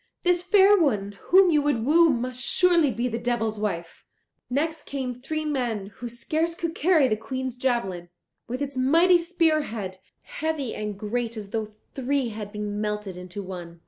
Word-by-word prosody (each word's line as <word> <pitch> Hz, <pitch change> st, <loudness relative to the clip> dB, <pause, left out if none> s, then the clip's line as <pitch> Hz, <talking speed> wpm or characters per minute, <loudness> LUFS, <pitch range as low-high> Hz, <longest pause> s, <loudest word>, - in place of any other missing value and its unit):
this 355 Hz, -1 st, +3 dB
fair 390 Hz, +2 st, +6 dB
one 210 Hz, -10 st, +1 dB
whom 375 Hz, -1 st, +6 dB
you 300 Hz, -2 st, +4 dB
would 285 Hz, -6 st, 0 dB
woo 330 Hz, +4 st, +5 dB
must 250 Hz, -1 st, -1 dB
surely 345 Hz, -3 st, +4 dB
be 245 Hz, 0 st, -1 dB
the 230 Hz, -1 st, -3 dB
devil's 225 Hz, -3 st, -1 dB
wife. 170 Hz, -5 st, -4 dB, 0.5 s
"Next 315 Hz, +4 st, -2 dB
came 265 Hz, -3 st, -3 dB
three 310 Hz, +6 st, -4 dB
men 235 Hz, -9 st, -2 dB
who 240 Hz, -, -6 dB
scarce 315 Hz, +8 st, -2 dB
could 335 Hz, -1 st, -3 dB
carry 320 Hz, -5 st, +3 dB
the 215 Hz, -, +1 dB
Queen's 255 Hz, +3 st, -5 dB
javelin, 235 Hz, -9 st, -1 dB, 0.4 s
with 250 Hz, +4 st, -3 dB
its 280 Hz, -1 st, -5 dB
mighty 330 Hz, +8 st, +5 dB
spear 335 Hz, -3 st, +2 dB
head, 205 Hz, -8 st, -6 dB, 0.2 s
heavy 305 Hz, -6 st, -3 dB
and 210 Hz, -2 st, -4 dB
great 230 Hz, +2 st, -3 dB
as 205 Hz, -2 st, -7 dB
though 220 Hz, -1 st, -2 dB, 0.3 s
three 270 Hz, -1 st, 0 dB
had 210 Hz, -2 st, -7 dB
been 210 Hz, 0 st, -4 dB
melted 210 Hz, -3 st, -3 dB
into 180 Hz, +2 st, -7 dB
one. 175 Hz, -3 st, -8 dB
250 Hz, 175 wpm, -25 LUFS, 210-310 Hz, 0.5 s, fair